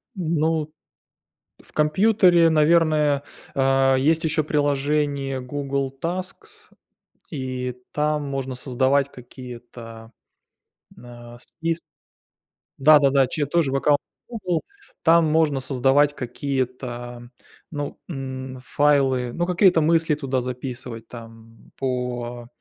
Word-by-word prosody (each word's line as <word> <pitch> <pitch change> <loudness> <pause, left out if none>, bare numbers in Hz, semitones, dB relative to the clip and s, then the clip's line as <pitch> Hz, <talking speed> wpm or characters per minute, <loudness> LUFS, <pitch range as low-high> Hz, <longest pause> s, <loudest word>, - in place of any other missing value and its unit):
Ну, 160 -3 0 0.9
в - - -19
компьютере, 175 +1 +4
наверное, 155 -2 +3 0.3
а, 135 0 +3
есть 155 +5 +2
ещё 155 -1 +1
приложение 145 -2 0
Google 140 0 -3
Tasks. 185 - -6 0.6
И 130 -4 -4 0.2
там 150 0 0
можно 135 -2 -4
создавать 130 +2 +1
какие-то 120 -2 -11 0.9
н 120 - -14
а 120 0 -12
спис 165 +5 -3 1.0
Да-да-да, 140 -2 +5
чее 145 +2 -2
тоже 155 -3 +1
в 135 - +1
аккаунте 145 +1 +3 0.3
"Гугл". 185 -8 -2 0.4
Там 165 0 +5
можно 155 -2 +2
создавать 135 +3 +2
какие-то, 125 -2 -4 0.4
ну, 145 -2 -5
м, 130 -4 -6
файлы, 135 -4 +2
ну, 175 0 -1
какие-то 180 -2 +4
мысли 165 0 +3
туда 135 -3 -2
записывать 125 -2 -6
там 115 -1 -13
по 125 -2 -3
140 Hz, 100 wpm, -23 LUFS, 125-155 Hz, 1.0 s, Да-да-да